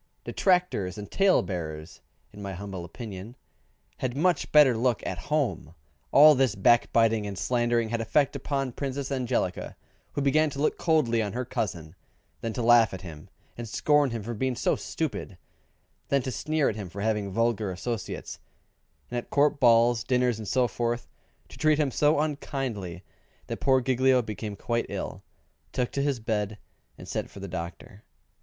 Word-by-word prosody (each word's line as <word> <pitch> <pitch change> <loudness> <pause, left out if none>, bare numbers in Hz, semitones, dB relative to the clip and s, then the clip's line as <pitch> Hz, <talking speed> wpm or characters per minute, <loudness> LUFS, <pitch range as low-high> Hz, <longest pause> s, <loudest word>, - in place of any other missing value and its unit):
Detractors 180 - +1
and 105 -1 -8
tale 195 -1 +4
bearers 80 -4 -6 0.3
(in 105 - -10
my 100 -1 -5
humble 95 -1 -6
opinion) 100 +4 -8 0.6
had 130 0 -3
much 175 +3 +1
better 145 -5 +7
look 120 0 0
at 90 +6 -5
home. 100 - -1 0.4
All 150 +2 +9
this 130 -5 +2
backbiting 115 0 +3
and 100 -2 -6
slandering 120 -1 +1
had 115 0 -1
effect 140 +5 +1
upon 135 -1 -2
Princess 135 +1 -4
Angelica, 125 -8 -1 0.4
who 145 - -1
began 155 +3 +3
to 140 - -7
look 150 - 0
coldly 140 -9 +2
upon 105 -2 -3
her 125 +1 -2
cousin, 90 -10 -4 0.5
then 115 - -2
to 120 - -3
laugh 115 -3 +5
at 95 - -9
him 80 -4 -10 0.3
and 120 -2 -7
scorn 145 +4 +3
him 115 -3 -4
for 120 +3 -4
being 130 +3 -1
so - - +1
stupid, - - -4
and - - -19 0.7
then 140 -1 +3
to 130 - -3
sneer 155 +3 0
at - - -1
him 100 -4 -6
for 100 +4 -7
having 105 -2 0
vulgar 115 -1 0
associates; 110 +3 -5 0.7
and 120 - -1
at - - -11
Court 145 0 +2
balls, 120 -1 +5
dinners, 125 -3 +1
and 110 - -7
so 125 +2 +2
forth, 120 +2 -2 0.4
to - - -14
treat 155 -1 +4
him 150 -3 +1
so 150 +3 +3
unkindly 130 - -3 0.4
that - - -5
poor 130 -1 +3
Giglio 130 0 +3
became 105 -1 -5
quite 115 +4 -2
ill, - - -5 0.5
took 125 -2 -1
to 140 - -1
his 140 -3 0
bed, 105 -2 -2 0.4
and - - -11
sent - - -3
for - - -11
the 100 - -6
doctor. 90 +3 -7
120 Hz, 175 wpm, -27 LUFS, 105-135 Hz, 0.7 s, All